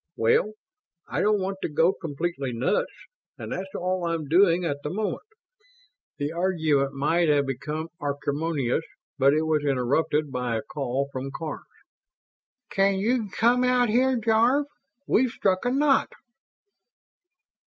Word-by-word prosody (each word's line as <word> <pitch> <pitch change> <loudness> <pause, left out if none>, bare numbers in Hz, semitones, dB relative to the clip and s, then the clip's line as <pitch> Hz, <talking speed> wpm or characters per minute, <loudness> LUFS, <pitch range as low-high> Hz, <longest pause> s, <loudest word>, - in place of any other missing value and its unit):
"Well, 115 - +2 0.5
I - - -2
don't 210 0 +3
want 195 +1 -3
to - - -2
go 165 +5 +3
completely 145 -4 -4
nuts, 125 - 0 0.5
and - - -7
that's 190 +1 -5
all 185 0 -1
I'm 165 -3 -2
doing 175 +2 +4
at 145 -3 -1
the 150 - -4
moment!" 210 - -3 0.9
The 145 0 -2
argument 160 -6 +1
might 160 +4 +1
have 145 -1 +3
become 150 +4 -4
acrimonious, 145 -1 -1 0.4
but 140 +2 +5
it 155 - +1
was 155 -2 +1
interrupted 145 +2 0
by 125 -2 -2
a 110 - -4
call 140 -1 -2
from 130 +1 -4
Karns. 155 +2 -6 1.1
"Can 195 0 +2
you 220 +2 0
come 240 +5 +2
out 250 -1 +3
here, 255 +3 +3
Jarve? 235 +5 +3 0.4
We've 255 +3 +3
struck 190 -2 0
a 245 - +2
knot." 275 +1 +3
165 Hz, 140 wpm, -25 LUFS, 145-205 Hz, 1.1 s, but